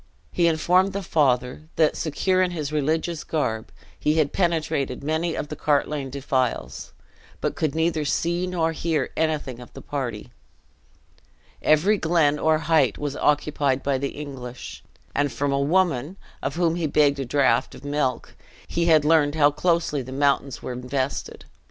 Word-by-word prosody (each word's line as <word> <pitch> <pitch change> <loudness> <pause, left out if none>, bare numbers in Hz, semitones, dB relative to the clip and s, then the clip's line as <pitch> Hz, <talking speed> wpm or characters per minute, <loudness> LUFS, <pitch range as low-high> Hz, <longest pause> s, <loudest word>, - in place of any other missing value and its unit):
He 170 -1 +2
informed 180 +4 +3
the 200 0 -3
father 135 -1 0
that, 155 -2 +3
secure 185 +4 0
in 185 - +2
his 155 -4 -4
religious 155 +2 -1
garb, 110 -8 -2 0.3
he 150 +1 +1
had 155 -3 +1
penetrated 155 -8 0
many 160 +3 -1
of 150 - -4
the 150 - -5
Cartlane 145 -1 0
defiles, 130 -2 -2 0.5
but - - -2
could 155 -2 -1
neither 160 -1 +1
see 170 +4 0
nor 165 -3 0
hear 160 -3 -1
anything 155 -6 -1
of 125 - -12
the - - -9
party. 125 -7 -4 1.3
Every 190 +7 +3
glen 160 -3 +2
or 160 0 +3
height 150 -9 +3
was 145 -1 -3
occupied 145 -2 +1
by 135 -2 0
the 140 +1 -4
English: 125 -4 -8 0.3
and 145 -1 +1
from 140 +4 -1
a 140 - +1
woman, 160 +1 +1 0.2
of 135 +2 -3
whom 170 -1 +1
he 165 -3 0
begged 145 -1 +3
a 135 - -2
draught 130 -2 +2
of - - -13
milk, 145 -4 -1 0.3
he 170 - 0
had 155 -3 +5
learned 150 -2 +3
how 145 -2 +5
closely 165 -2 0
the 130 +1 -9
mountains 140 -1 0
were 125 - -4
invested. 130 +2 -3
150 Hz, 160 wpm, -24 LUFS, 140-165 Hz, 1.3 s, had